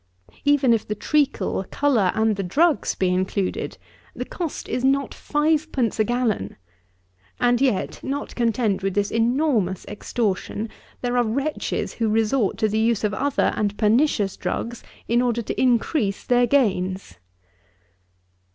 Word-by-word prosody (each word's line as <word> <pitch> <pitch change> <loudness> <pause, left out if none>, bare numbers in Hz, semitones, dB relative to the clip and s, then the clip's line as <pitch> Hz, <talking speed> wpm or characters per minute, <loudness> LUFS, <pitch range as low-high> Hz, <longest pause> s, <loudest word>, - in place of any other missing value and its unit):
Even 285 -4 +4
if 225 - -1
the 210 - -2
treacle, 285 -5 0
colour, 245 -10 +2
and 220 -1 +2
the 195 - -3
drugs, 300 - +2
be 185 - +1
included, 185 +1 -1 0.4
the - - -4
cost 335 -5 -5
is 250 - -2
not 275 +1 +2
fivepence 295 -6 0
a - - +5
gallon; 230 - -1 0.8
and 245 0 +2
yet, 255 -8 0
not 280 +2 -4
content 225 -4 0
with 195 -1 -2
this 205 0 0
enormous 230 - +1
extortion, 210 0 -2 0.3
there 245 0 -1
are 245 - +4
wretches 275 +7 -2
who 225 -2 -1
resort 220 +1 +1
to 220 - +2
the 215 +1 0
use 225 -1 +1
of 210 -1 0
other 280 +4 +1
and 205 -1 -1
pernicious 215 -2 +2
drugs, 235 0 -4 0.3
in 235 +1 +3
order 240 -1 0
to - - -3
increase 240 -3 +1
their 245 0 +3
gains! 190 - 0
230 Hz, 140 wpm, -23 LUFS, 205-270 Hz, 0.8 s, a